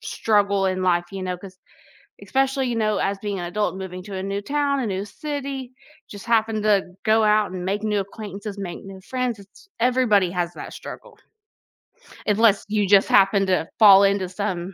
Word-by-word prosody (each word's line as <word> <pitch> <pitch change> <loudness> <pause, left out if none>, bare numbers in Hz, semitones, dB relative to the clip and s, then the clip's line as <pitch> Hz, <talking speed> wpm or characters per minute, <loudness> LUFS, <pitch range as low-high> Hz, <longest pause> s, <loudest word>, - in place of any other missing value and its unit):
struggle 200 -2 +1
in 185 0 -1
life, 175 -1 +2
you 195 - -5
know, 180 -1 -3
'cause 185 0 -13 0.6
especially, 270 0 0
you 240 - -2
know, 215 -2 0
as 195 0 -1
being 200 -3 -4
an 175 - -4
adult, 205 +3 -2
moving 185 -1 -7
to 200 -1 -8
a 190 - -4
new 200 +1 -3
town, 280 +3 0
a 245 - -2
new 195 +1 -3
city, 275 0 -6 0.4
just 205 0 -10
happen 225 -2 +1
to 210 -2 +3 0.2
go 220 0 +3
out 210 -2 +3
and 180 -1 -5
make 200 +3 -2
new 210 -1 0
acquaintances, 200 0 -7
make 185 -3 -6
new 195 -1 -10
friends, 250 0 -3
it's 200 - -18
everybody 230 -6 +3
has 175 -1 -2
that - - -9
struggle, 465 -4 -10 1.1
unless 210 -1 +3
you 205 -2 +1
just 200 0 +5
happen 195 0 +4
to 180 -3 +1
fall 200 -3 +8
into 195 -2 +1
some 185 -1 -4
200 Hz, 185 wpm, -23 LUFS, 190-225 Hz, 1.1 s, fall